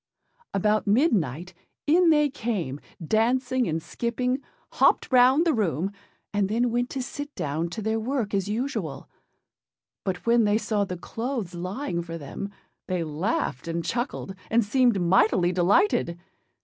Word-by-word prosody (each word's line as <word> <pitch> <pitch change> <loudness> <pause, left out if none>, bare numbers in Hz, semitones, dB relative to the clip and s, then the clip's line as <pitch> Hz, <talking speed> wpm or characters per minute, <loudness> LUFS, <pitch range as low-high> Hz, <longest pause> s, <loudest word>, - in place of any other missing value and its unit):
About 210 +2 +1
midnight 185 - +1 0.3
in 335 +3 +5
they 300 -2 +5
came, 200 - -3 0.3
dancing 250 +5 +1
and 160 0 -2
skipping, 250 - -2 0.3
hopped - - +3
round 260 +5 +6
the 330 - +3
room, 190 - 0 0.4
and 205 -1 +1
then 235 +3 +1
went 245 +1 0
to 265 - -3
sit 290 +3 -7
down 155 +4 -2
to 215 +5 -5
their 220 +1 0
work 235 -2 -2
as 195 -1 0
usual; 245 +7 -3 1.0
but 180 -2 -3
when 235 0 +4
they 210 0 +3
saw 210 -2 0
the 180 -2 -5
clothes 225 -1 -4
lying 180 +2 -3
for 165 -1 -6
them, 160 +6 -6 0.4
they 180 -3 -1
laughed 155 - -2
and 165 0 -2
chuckled, 240 -3 -3 0.2
and 230 -1 +3
seemed 240 -1 +3
mightily 180 0 +3
delighted. 180 - +2
215 Hz, 145 wpm, -26 LUFS, 175-250 Hz, 1.0 s, round